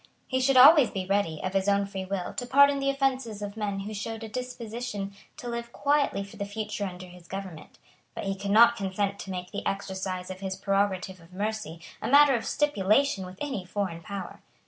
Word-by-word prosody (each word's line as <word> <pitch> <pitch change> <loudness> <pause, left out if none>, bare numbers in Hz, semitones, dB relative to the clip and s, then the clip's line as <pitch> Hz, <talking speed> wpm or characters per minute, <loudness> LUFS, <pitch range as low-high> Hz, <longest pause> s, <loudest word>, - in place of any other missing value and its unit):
He 260 - 0
should 265 0 +3
always 280 +1 +9
be 190 -1 -4
ready, 190 -5 0
of 185 - -2
his 195 +1 +1
own 200 0 +3
free 195 -1 -5
will, 190 -1 -3
to 245 - -4
pardon 280 +2 +5
the 275 0 +1
offences 260 -6 -1
of 200 0 -5
men 205 -3 -2
who 210 +2 -6
showed 225 +2 -5
a - - -5
disposition 230 -3 -5 0.2
to 245 - -7
live 235 0 -4
quietly 285 -8 +1
for 200 +2 -12
the 200 - -3
future 210 0 -4
under 180 0 -8
his 180 -1 -15
government; 190 -5 -8 0.4
but - - -4
he 195 -1 -1
could 195 +1 -5
not 230 +3 +7
consent 200 -1 -2
to - - -7
make 180 -1 -5
the 200 - -4
exercise 190 -2 -3
of 185 - -8
his 190 -1 -4
prerogative 195 -2 -1
of 165 +2 -18
mercy 205 -4 -4 0.2
a - - -2
matter 285 +1 +7
of 235 - -1
stipulation 215 -6 +2
with 185 0 -11
any 265 -10 -3
foreign 180 -2 -3
power. 195 +2 -7
200 Hz, 210 wpm, -27 LUFS, 190-235 Hz, 0.4 s, always